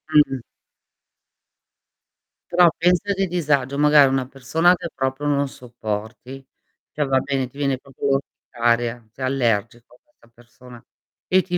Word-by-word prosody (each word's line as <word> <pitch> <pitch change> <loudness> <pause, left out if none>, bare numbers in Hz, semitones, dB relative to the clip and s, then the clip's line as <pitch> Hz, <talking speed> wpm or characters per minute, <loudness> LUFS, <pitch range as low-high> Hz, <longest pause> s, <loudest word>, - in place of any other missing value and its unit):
Mh-mh. 145 -3 +4 2.1
Però 175 0 +6
pensa 180 +4 +2
che 195 0 -1
disagio 145 -6 0
magari 150 -1 +6
una 135 -1 0
persona 140 +7 +2
che 170 - -6
proprio 135 +2 -3
non 140 -1 +1
sopporti, 120 +1 -7 0.5
cioè, 150 - -1
va 135 -1 +2
bene 135 -2 -2
ti 135 - -18
viene 140 -2 0
proprio 135 +1 -6
contraria, 120 -2 -2
sei 130 +3 -5
allergico 120 -2 -1
a - - -26
questa 115 - -28
persona, 120 0 -16 0.4
e 185 0 +4
ti 180 -1 -3
135 Hz, 135 wpm, -22 LUFS, 120-150 Hz, 2.1 s, Però